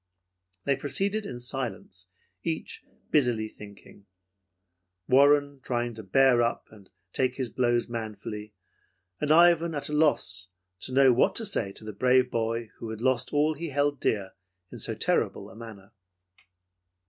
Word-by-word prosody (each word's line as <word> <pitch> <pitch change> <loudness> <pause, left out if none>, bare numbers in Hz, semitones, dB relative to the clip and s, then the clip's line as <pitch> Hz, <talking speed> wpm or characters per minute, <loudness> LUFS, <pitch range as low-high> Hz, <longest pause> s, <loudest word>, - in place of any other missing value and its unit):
They 140 - +2
proceeded 195 +10 -2
in 120 - -6
silence, 120 -7 -6 0.3
each 160 -1 -4 0.3
busily 120 -7 +2
thinking. 100 -1 -14 1.0
Warren 140 +1 +4
trying 120 -2 -2
to 110 - -8
bear 125 +4 +4
up 120 0 -1
and 100 -3 -17 0.2
take 130 -1 0
his 130 -4 -3
blows 120 -1 +1
manfully, 105 -2 -6 0.6
and 150 - 0
Ivan 170 0 +5
at 145 - -1
a - - -4
loss 120 - +1 0.3
to - - -5
know 130 -1 +5
what 120 - +2
to 225 - -1
say 115 - -1
to 110 - -6
the 110 - -6
brave 125 +3 +3
boy 115 0 -2
who 115 - -6
had 110 -1 -6
lost 130 0 0
all 150 +1 +2
he 165 +2 -5
held 145 0 0
dear 100 -3 -1 0.4
in - - -9
so - - 0
terrible - - 0
a - - -14
manner. 110 -3 -11
125 Hz, 150 wpm, -27 LUFS, 110-145 Hz, 1.0 s, Ivan